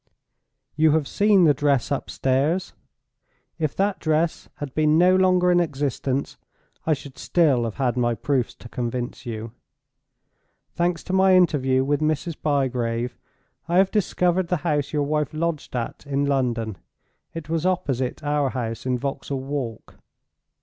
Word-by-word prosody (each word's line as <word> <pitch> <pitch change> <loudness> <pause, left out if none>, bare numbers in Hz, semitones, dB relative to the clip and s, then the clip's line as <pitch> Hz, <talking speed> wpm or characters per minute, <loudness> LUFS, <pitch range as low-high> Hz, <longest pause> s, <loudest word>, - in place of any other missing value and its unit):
You 155 0 +4
have 155 -3 +1
seen 205 -2 +4
the 155 -3 +6
dress 140 -1 +1
upstairs. 140 +5 0 0.9
If 155 -3 -1
that 195 0 0
dress 160 +1 0
had 145 -3 -7
been 155 0 +3
no 180 +2 +5
longer 185 -1 +4
in 175 - +4
existence, 140 -3 -2 0.5
I 155 - +4
should 135 -1 -12
still 145 -9 +2
have 115 - -4
had 125 -2 0
my 120 -1 +1
proofs 130 -1 -1
to - - -12
convince 120 +2 -4
you. 110 -1 -5 1.2
Thanks 175 0 0
to 185 - -5
my 190 0 +5
interview 135 -7 +3
with 145 +2 0
Mrs. 155 +2 0
Bygrave 125 -4 0 0.5
I 170 +1 +1
have 190 0 +4
discovered 180 -3 +1
the 180 - +1
house 145 -3 0
your 150 -2 0
wife 150 0 -1
lodged 160 -4 -2
at 120 +3 -4
in 140 0 0
London; 120 - -1 0.6
it 165 -2 -6
was 165 0 -1
opposite 135 -10 -1
our 145 -2 +1
house 115 -1 -4
in 125 -1 +1
Vauxhall 135 +1 -4
Walk. 135 -5 -5
145 Hz, 150 wpm, -23 LUFS, 130-170 Hz, 1.2 s, the